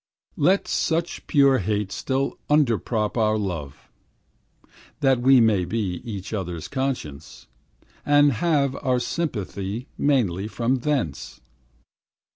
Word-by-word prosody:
Let 185 +7 +2
such 165 +1 -1
pure 140 -3 +4
hate 105 0 -2
still 135 +1 -2
underprop 120 -6 +1
Our 110 -1 +2
love, 80 -9 -5 1.1
that 135 -3 +3
we 130 +1 +6
may 110 -5 +3
be 90 -1 -3
Each 100 -3 -6
other's 90 -5 -4
conscience, 125 - -4 0.6
And 145 0 +5
have 140 0 +1
our 130 -2 0
sympathy 110 - -4
Mainly 105 -9 +1
from 120 +3 0
thence. 125 - -3
120 Hz, 105 wpm, -24 LUFS, 100-140 Hz, 1.1 s, we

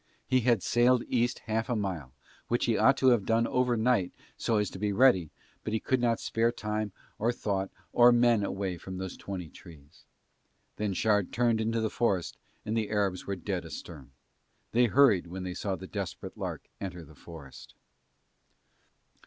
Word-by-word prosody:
He 130 0 +3
had 120 -5 +2
sailed 120 0 +3
East 120 0 +1
half 110 +1 -1
a 120 - +1
mile, 90 - -3 0.4
which 120 - +1
he 115 - +2
ought 135 - +4
to 130 - +4
have 120 -5 +3
done 115 +2 +2
overnight 120 -5 +1 0.2
so 115 - 0
as 105 -2 0
to 95 - -8
be 105 0 0
ready, 100 - +4 0.3
but 110 - -3
he 110 - +1
could 130 +2 0
not 115 -2 +2
spare 115 +1 +1
time 105 -2 -3 0.3
or 115 +3 +2
thought 100 -5 -2 0.2
or 120 0 +7
men 120 -3 +4
away 95 -3 -3
from 95 +2 -7
those 95 -1 -5
twenty 95 -4 -6
trees. 80 -1 -16 0.7
Then 105 -2 -1
Shard 105 -1 +1
turned 115 -2 +2
into 115 +1 0
the 110 - -1
forest 100 -8 0 0.3
and 110 +1 -2
the 110 -2 -1
Arabs 100 -4 -1
were 100 - -1
dead 90 - -3
astern. 70 -5 -9 0.6
They 120 +2 +4
hurried 115 -8 +4
when 90 +2 -6
they 90 -1 -4
saw 95 +1 -2
the 95 - -9
Desperate 100 -1 -6
Lark - - -5
enter 90 -4 -6
the 75 - -16
forest. 75 -3 -12
105 Hz, 180 wpm, -29 LUFS, 95-120 Hz, 0.7 s, or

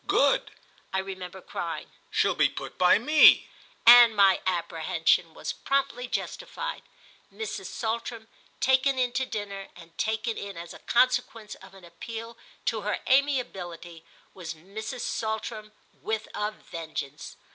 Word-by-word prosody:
"Good!" - - +3 0.4
I 190 - -1
remember 190 -1 -6
crying, - - -5 0.2
"she'll - - +2
be - - +3
put - - -8
by 180 0 +5
me;" 300 +8 +6 0.4
and 240 -1 +9
my 195 -2 +5
apprehension 170 -3 +1
was - - -4
promptly 275 -3 -1
justified. - - -4 0.5
Mrs. 445 - -5
Saltram 230 0 -4 0.3
taken 265 +1 +3
in 250 -1 +1
to 260 +1 -1
dinner, 200 -3 -5
and 170 -1 -15
taken 220 +1 -1
in 200 -3 -7
as 170 0 -8
a - - -12
consequence 235 -3 +1
of 190 0 -14
an 190 -2 -14
appeal 230 +7 -8 0.3
to 225 -2 0
her 210 +1 -1
amiability, 190 - 0 0.3
was 165 -4 -7
Mrs. 220 - -7
Saltram 220 -1 -3 0.3
with 220 0 -2
a 210 0 -1
vengeance. 160 -8 -7
215 Hz, 135 wpm, -27 LUFS, 185-240 Hz, 0.5 s, and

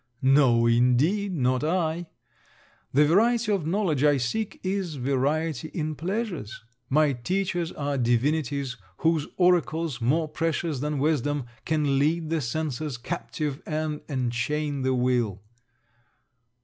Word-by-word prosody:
No 130 -4 +5
indeed, 125 - +3
not 130 -2 +1
I. 165 0 0 0.8
The 145 +3 +5
variety 220 +7 +3
of 190 -7 0
knowledge 170 -6 +1
I 145 -1 +5
seek 200 - -2
is 185 -4 -2
variety 140 +3 0
in 155 -2 -2
pleasures. 175 - -4 0.3
My 150 +1 +3
teachers 175 +6 -1
are 140 -1 -2
divinities 135 +2 0 0.2
whose 160 -2 +1
oracles, 165 -6 +2
more 155 +7 +2
precious 160 -1 -2
than 150 +2 -2
wisdom, 145 -1 0 0.2
can 150 -3 +1
lead 160 +2 +1
the 165 -2 +1
senses 150 +1 -3
captive 150 +1 -4
and 155 -1 -2
enchain 135 +3 -1
the 130 0 +1
will. 120 -6 0
150 Hz, 120 wpm, -26 LUFS, 130-165 Hz, 0.8 s, No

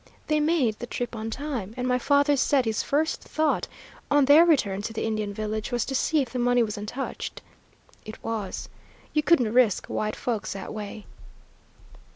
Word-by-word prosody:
They 305 0 +1
made 295 -8 +1
the 240 - -5
trip 245 -1 -4
on 220 0 -4
time, 235 -5 -4
and 250 0 -1
my 250 0 +2
father 285 +2 +3
said 275 -1 +2
his 220 -1 0
first 310 +3 0
thought, 310 0 0 0.4
on 290 -1 +4
their 305 +5 +7
return 205 - +2
to 225 +2 -5
the 225 - -2
Indian 215 -2 -2
village, 215 +3 -3
was 240 -2 0
to 270 - -4
see 295 +2 +2
if 245 - -10
the 255 - -3
money 245 0 +3
was 215 -2 -3
untouched. 210 +6 -5 0.6
It 215 - -10
was. 220 -4 -4 0.5
You 305 - +3
couldn't 255 -9 +3
risk 245 -5 +3
white 215 0 -2
folks 225 -4 -3
that 195 - -7
way." 210 0 -7
245 Hz, 185 wpm, -26 LUFS, 215-285 Hz, 0.6 s, their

